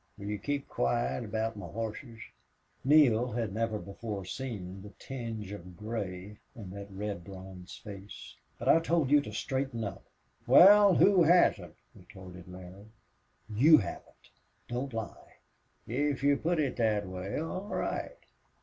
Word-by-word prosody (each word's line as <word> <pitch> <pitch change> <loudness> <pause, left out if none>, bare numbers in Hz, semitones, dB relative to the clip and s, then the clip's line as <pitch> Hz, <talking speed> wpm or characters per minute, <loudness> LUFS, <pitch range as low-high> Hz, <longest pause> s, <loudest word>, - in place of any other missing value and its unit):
"Will 100 - -9
you 105 0 -3
keep 145 +5 -3
quiet 120 +1 -1
aboot 110 +1 -2
my 100 - -7
hosses?" 115 +2 -6 0.6
Neale 125 -5 +4
had 115 -4 -2
never 110 0 -1
before 100 -1 -6
seen 100 -5 -6
the 105 - -10
tinge 115 -6 -6
of 90 -3 -9
gray 105 -2 -5 0.2
in 100 -6 -9
that 100 +1 -8
red 100 -2 -5
bronze 95 -1 -10
face. 100 -1 -10 0.2
"But - - -6
I 165 - +7
told 165 -4 +1
you 145 0 +6
to 110 - -8
straighten 130 +1 -2
up!" 100 -3 -6 0.4
"Wal, 195 +8 +8
who 195 -2 +5
hasn't?" 145 - +3 0.2
retorted 90 -2 -13
Larry. 90 +3 -11 0.6
"You 135 +9 +6
haven't! 85 - -7 0.4
Don't 125 +3 -3
lie." 115 -2 -7 0.5
"If 140 +3 -1
you 145 0 +5
put 165 +3 0
it 140 -4 -1
thet 110 -3 +1
way, 95 +1 -5
all 185 +5 -4
right. - - -3
110 Hz, 145 wpm, -30 LUFS, 100-135 Hz, 0.6 s, Wal